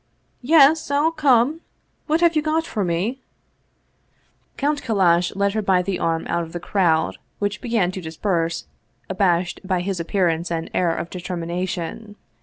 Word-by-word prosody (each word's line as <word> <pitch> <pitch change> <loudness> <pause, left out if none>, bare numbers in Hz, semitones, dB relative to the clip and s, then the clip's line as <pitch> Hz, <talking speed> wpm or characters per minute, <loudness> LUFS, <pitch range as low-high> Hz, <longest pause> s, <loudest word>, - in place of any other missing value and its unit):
" - - -44
Yes, 310 +1 +6
I'll 290 +3 +2
come! 295 -1 +2 0.5
What 315 +2 +1
have 340 -1 +4
you 305 - +3
got 315 +1 0
for 210 -10 -2
me? 190 +10 -1 0.6
" - - -42
Count 290 +1 0
Kallash 180 -6 +2
led 200 0 +1
her 215 - 0
by 190 -3 +2
the 190 0 -2
arm 165 0 -1
out 170 - 0
of 165 -1 -8
the 175 - -4
crowd, 170 -3 +1 0.2
which 205 0 -2
began 230 -8 0
to 185 - -6
disperse, 165 0 -2 0.5
abashed 180 -2 +1
by 185 -2 -1
his 190 0 -3
appearance 170 -1 0
and 165 -1 -3
air 170 -2 +1
of 170 - -5
determination. 180 +3 -4
190 Hz, 165 wpm, -22 LUFS, 170-240 Hz, 0.6 s, Yes